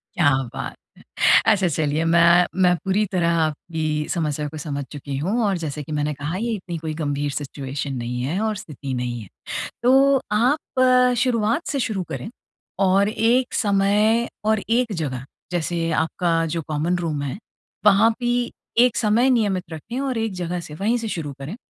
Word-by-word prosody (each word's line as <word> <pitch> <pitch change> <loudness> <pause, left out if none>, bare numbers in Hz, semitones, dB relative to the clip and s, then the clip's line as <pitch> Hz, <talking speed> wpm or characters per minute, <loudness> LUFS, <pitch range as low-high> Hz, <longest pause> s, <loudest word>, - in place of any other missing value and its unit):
क्या 175 -7 +4 0.2
बात - - -4 0.5
है। - - +7
अच्छा 190 -3 +2
चलिए 155 0 0
मैं, 170 +1 +5 0.2
मैं 180 -1 +5
पूरी 195 +2 +2
तरह 175 -3 +2
आपकी 160 +1 -2 0.3
समस्या 150 -3 -1
को 155 - -10
समझ 140 -1 -4
चुकी 140 -1 -5
हूँ 190 - 0
और 200 -2 +1
जैसे 150 -2 -4
कि 150 - -8
मैंने 150 0 -1
कहा 145 +5 -4
ये 230 +4 -2
इतनी 180 -4 -5
कोई 155 -1 -4
गंभीर 145 -2 -2
सिचुएशन 140 -1 -4
नहीं 125 0 -3
है 150 +9 -1
और 220 -1 0
स्थिति 145 -9 -6
नहीं 120 -1 -3
है। 105 - -10 0.6
तो 270 +2 +5
आप 255 +1 +3
शुरुआत 235 +4 +1
से 280 - -1
शुरू 215 -6 -1
करें - - -5 0.6
और 195 +2 +3
एक 235 +4 +1
समय 210 +3 +2 0.2
और 220 0 +3
एक 235 -1 +2
जगह 135 -7 -3 0.3
जैसे 170 -1 -1
आपका 170 +1 -1 0.2
जो 165 - -1
कॉमन 155 +3 0
रूम 160 -4 -2
है, 140 +4 -4 0.5
वहाँ 210 +2 +6
भी 240 0 0 0.3
एक 240 -1 +5
समय 230 +4 +3
नियमित 205 -7 +1
रखें 215 - -6
और 270 -3 -1
एक 225 -2 -1
जगह 180 0 -3
से 155 -3 -9
वहीं 215 +8 +1
से 230 -1 -4
शुरू 160 -8 -4
करें। 145 +9 -6
180 Hz, 175 wpm, -22 LUFS, 150-225 Hz, 0.6 s, है